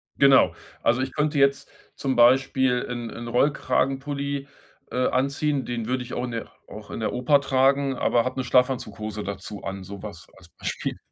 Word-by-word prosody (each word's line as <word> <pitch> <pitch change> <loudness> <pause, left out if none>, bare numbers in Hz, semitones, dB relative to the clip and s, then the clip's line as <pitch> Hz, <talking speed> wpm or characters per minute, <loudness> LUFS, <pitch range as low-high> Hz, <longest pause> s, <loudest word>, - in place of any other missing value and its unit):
Genau. 135 -1 +5 0.3
Also, 120 +3 +2
ich 130 - -3
könnte 150 0 0
jetzt 140 0 +2 0.3
zum 135 -2 -1
Beispiel 130 +1 +4
'n 120 -2 -4
'n 120 0 -7
Rollkragenpulli, 140 +2 0 0.4
äh, 125 0 +1
anziehen, 140 +2 0
den 120 -2 -3
würde 125 0 -1
ich 120 - -9
auch - - -2
in 125 - -3
der 115 -1 -5 0.2
auch 105 0 -10
in - - -5
der - - -1
Oper 140 +3 +3
tragen, 135 0 +2
aber 120 -1 +2
hab 130 - -3
'ne 130 - -1
Schlafanzughose 110 -5 0
dazu 100 +1 -6
an, 95 -1 -5
sowas 100 -2 -9
als 85 -2 -17
Beispiel. - - -4
130 Hz, 175 wpm, -25 LUFS, 115-135 Hz, 0.4 s, Genau